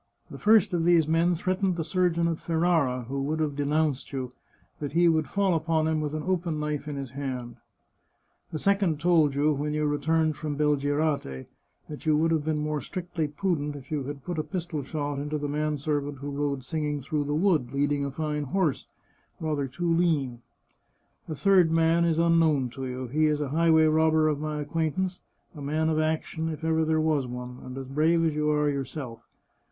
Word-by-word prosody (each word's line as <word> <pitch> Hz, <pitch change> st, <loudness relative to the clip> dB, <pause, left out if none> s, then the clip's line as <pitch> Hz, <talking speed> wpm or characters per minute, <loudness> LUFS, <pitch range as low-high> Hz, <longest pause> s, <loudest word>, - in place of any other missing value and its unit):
The -, -, -8 dB
first 210 Hz, -3 st, +4 dB
of 170 Hz, -2 st, +1 dB
these 170 Hz, -2 st, +4 dB
men 165 Hz, +2 st, +2 dB
threatened 185 Hz, +2 st, 0 dB
the 165 Hz, -, -2 dB
surgeon 170 Hz, 0 st, +1 dB
at 165 Hz, -1 st, -2 dB
Ferrara, 160 Hz, -7 st, +1 dB
who 135 Hz, +4 st, -4 dB
would 155 Hz, +3 st, -1 dB
have 150 Hz, -2 st, -1 dB
de 145 Hz, 0 st, -1 dB
nounced 150 Hz, -2 st, 0 dB
you, 130 Hz, -2 st, -4 dB, 0.5 s
that 145 Hz, -1 st, -4 dB
he 170 Hz, +1 st, +4 dB
would 160 Hz, -2 st, +2 dB
fall 200 Hz, -2 st, +1 dB
upon 160 Hz, -1 st, +1 dB
him 160 Hz, -1 st, 0 dB
with 150 Hz, 0 st, -3 dB
an 155 Hz, -, -3 dB
open 175 Hz, -4 st, -1 dB
knife 150 Hz, -1 st, -3 dB
in 150 Hz, -, -4 dB
his 135 Hz, -3 st, -5 dB
hand; 130 Hz, -4 st, -5 dB, 0.9 s
the 155 Hz, -, -3 dB
second 195 Hz, -3 st, +1 dB
told 160 Hz, -4 st, +3 dB
you, 150 Hz, +2 st, +3 dB
when 150 Hz, +1 st, -2 dB
you 150 Hz, 0 st, 0 dB
returned 155 Hz, +1 st, +1 dB
from 150 Hz, -1 st, -4 dB
Belgirate, 145 Hz, -, 0 dB, 0.4 s
that 150 Hz, +1 st, -9 dB
you 155 Hz, -1 st, +4 dB
would 165 Hz, +2 st, +2 dB
have 160 Hz, -2 st, +1 dB
been 155 Hz, 0 st, 0 dB
more 150 Hz, -1 st, -2 dB
strictly 175 Hz, 0 st, -3 dB
prudent 150 Hz, -2 st, -2 dB
if 135 Hz, 0 st, -11 dB
you 145 Hz, -4 st, -2 dB
had 140 Hz, -1 st, -7 dB
put 175 Hz, -3 st, -3 dB
a -, -, 0 dB
pistol 170 Hz, -5 st, -4 dB
shot 145 Hz, 0 st, -3 dB
into 150 Hz, +2 st, -2 dB
the 145 Hz, 0 st, -3 dB
man 150 Hz, +1 st, -1 dB
servant 145 Hz, 0 st, -2 dB
who 140 Hz, +2 st, -6 dB
rode 140 Hz, -2 st, -2 dB
singing 150 Hz, 0 st, -2 dB
through 145 Hz, +2 st, -2 dB
the 145 Hz, +1 st, -1 dB
wood, 155 Hz, -8 st, +2 dB
leading 140 Hz, +1 st, 0 dB
a 140 Hz, -, -2 dB
fine 150 Hz, +1 st, -3 dB
horse, 160 Hz, 0 st, 0 dB, 0.5 s
rather 150 Hz, -3 st, -1 dB
too 165 Hz, +6 st, -1 dB
lean. 145 Hz, -8 st, +1 dB, 0.9 s
The 155 Hz, -, -4 dB
third 185 Hz, 0 st, +4 dB
man 165 Hz, +1 st, +3 dB
is 165 Hz, -2 st, +1 dB
unknown 165 Hz, -6 st, +3 dB
to 135 Hz, +1 st, -5 dB
you; 130 Hz, 0 st, -4 dB
he 155 Hz, +6 st, +1 dB
is 150 Hz, -1 st, +1 dB
a 145 Hz, -2 st, -2 dB
highway 160 Hz, +1 st, +4 dB
robber 155 Hz, 0 st, +3 dB
of 150 Hz, -2 st, -1 dB
my 150 Hz, 0 st, -3 dB
acquaintance, 165 Hz, +5 st, -2 dB, 0.3 s
a 150 Hz, -, -9 dB
man 155 Hz, +3 st, 0 dB
of 155 Hz, -1 st, +1 dB
action, 160 Hz, +1 st, -1 dB
if 155 Hz, 0 st, -6 dB
ever 160 Hz, 0 st, +2 dB
there 160 Hz, 0 st, +1 dB
was 155 Hz, -4 st, +1 dB
one, 125 Hz, 0 st, -7 dB
and 130 Hz, +1 st, -8 dB
as 135 Hz, -, -5 dB
brave 160 Hz, +5 st, +2 dB
as 160 Hz, -, +1 dB
you 150 Hz, 0 st, 0 dB
are 150 Hz, 0 st, +2 dB
yourself. 135 Hz, -3 st, -4 dB
155 Hz, 205 wpm, -27 LUFS, 145-165 Hz, 0.9 s, first